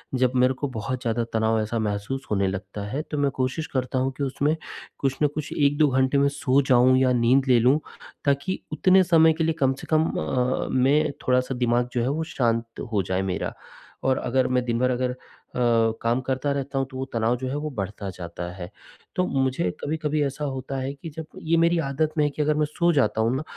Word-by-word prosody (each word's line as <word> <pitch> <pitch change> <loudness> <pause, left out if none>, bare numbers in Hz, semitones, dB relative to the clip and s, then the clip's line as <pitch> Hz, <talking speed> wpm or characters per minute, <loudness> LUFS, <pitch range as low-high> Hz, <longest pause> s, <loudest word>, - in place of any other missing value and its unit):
जब 125 -1 +2
मेरे 125 +1 +4
को 145 +2 -3
बहुत 125 +4 -3
ज़्यादा 115 0 0
तनाव 110 0 +2
ऐसा 110 +2 -2
महसूस 105 +5 -3
होने 100 -2 +2
लगता 95 +2 -5
है, 135 +8 -2
तो 150 -1 -6
मैं 140 -1 +1
कोशिश 130 +5 -2
करता 130 0 -1
हूँ 130 +1 0
कि 145 - -2
उसमें 140 +3 0 0.4
कुछ 135 -1 0
न - - +6
कुछ 150 -1 -4
1-2 145 +1 +3
घंटे 130 +1 +2
मैं 140 0 +4
सो 140 -1 +2
जाऊँ 130 +1 +5
या 130 -1 +3
नींद 125 +3 +3
ले 125 -2 +5
लूँ, 130 +6 +4 0.5
ताकि 140 +7 0
उतने 185 +4 +5
समय 160 -2 +5
के 160 - -1
लिए 160 0 +1
कम 135 0 +3
से - - -10
कम 155 0 +4
अ 80 - -2 0.4
अ, - - -6
मैं 140 +4 +3 0.2
थोड़ा-सा 125 +1 +2
दिमाग 120 0 +1
जो 120 - 0
है 125 - 0
वो 155 +3 -1
शांत 115 -2 0
हो 100 - +3
जाए 95 +1 -1
मेरा। 95 -1 -2 0.5
और 130 - +3
अगर 130 +1 +1
मैं 125 0 +1
दिन 120 -1 0
भर 125 +1 +2
अगर 125 0 0
अ, 125 - -8 0.8
काम 115 +2 +1
करता 130 +2 -1
रहता 140 0 -3
हूँ, 135 - 0
तो 130 - -7
वो 130 - -3
तनाव 115 +1 +1
जो 130 +1 -4
है 135 - -3
वो 155 +1 -3
बढ़ता 100 0 -4
जाता 85 0 -6
है। 90 -1 -8 0.5
तो 180 - +2
मुझे 130 -8 0
कभी-कभी 155 0 -1
ऐसा 145 +1 -3
होता 135 0 -4
है 135 +2 -3
कि 155 +4 -9
जब 160 +1 -7 0.2
ये 165 +1 +2
मेरी 170 +1 +3
आदत 155 +1 -1
में 150 - +4
है - - +1
कि 150 - -3
अगर 150 0 +2
मैं 150 0 +2
सो 170 +3 +1
जाता 110 -6 +2
हूँ 115 +3 +1
ना, 140 - -2
130 Hz, 230 wpm, -24 LUFS, 120-145 Hz, 0.8 s, न